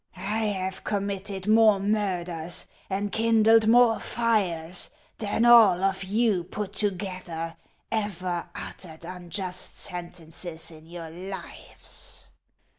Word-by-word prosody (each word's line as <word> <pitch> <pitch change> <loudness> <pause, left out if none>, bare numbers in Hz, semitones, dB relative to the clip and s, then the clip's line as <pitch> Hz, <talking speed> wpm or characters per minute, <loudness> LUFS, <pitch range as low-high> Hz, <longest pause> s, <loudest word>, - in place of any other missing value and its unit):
I 210 +4 -1
have 190 -2 -2
com 200 -1 -1
mitted 195 -1 -4
more 215 -1 +5
murders 180 -5 0 0.2
and 200 +1 -2
kindled 225 0 +4
more 235 0 +6
fires 185 -7 +1 0.3
than 225 +2 +1
all 220 -7 +7
of 195 0 +1
you 205 -1 +1
put 200 +3 -5
together 185 -5 -3 0.4
ever 185 -5 -2
uttered 165 -3 -8
unjust 180 +1 -4
sentences 170 -1 -3
in 160 0 -14
your 165 -1 -8
lives. 190 +3 -7
190 Hz, 110 wpm, -26 LUFS, 175-210 Hz, 0.4 s, all